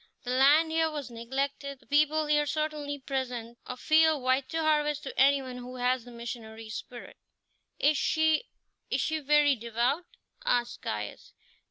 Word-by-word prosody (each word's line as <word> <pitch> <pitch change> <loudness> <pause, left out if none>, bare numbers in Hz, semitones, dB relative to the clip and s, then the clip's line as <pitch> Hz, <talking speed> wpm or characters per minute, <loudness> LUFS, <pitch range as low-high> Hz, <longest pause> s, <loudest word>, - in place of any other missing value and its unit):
The 245 - -3
land 290 +5 +5
here 320 0 +2
was 290 -5 -6
neglected; 275 +4 -3
the - - -24
people 305 +1 +2
here 295 0 +2
certainly 300 -1 -2
present 250 -4 -4
a 250 - -5
field 315 -1 +3
white 260 +1 +1
to 325 - -1
harvest 300 -1 +1
to 270 - -6
anyone 270 -2 +3
who 250 +1 -8
has 250 -1 0
the 245 - -11
missionary 225 -2 -8
spirit." 240 +2 -8 0.6
"Is 295 0 +3
she 315 +7 +2 0.4
is - - 0
she 315 0 0
very 295 -1 +4
devout?" 240 +8 -1 0.4
asked 240 0 0
Caius. 105 -1 -5
275 Hz, 155 wpm, -29 LUFS, 245-300 Hz, 0.6 s, land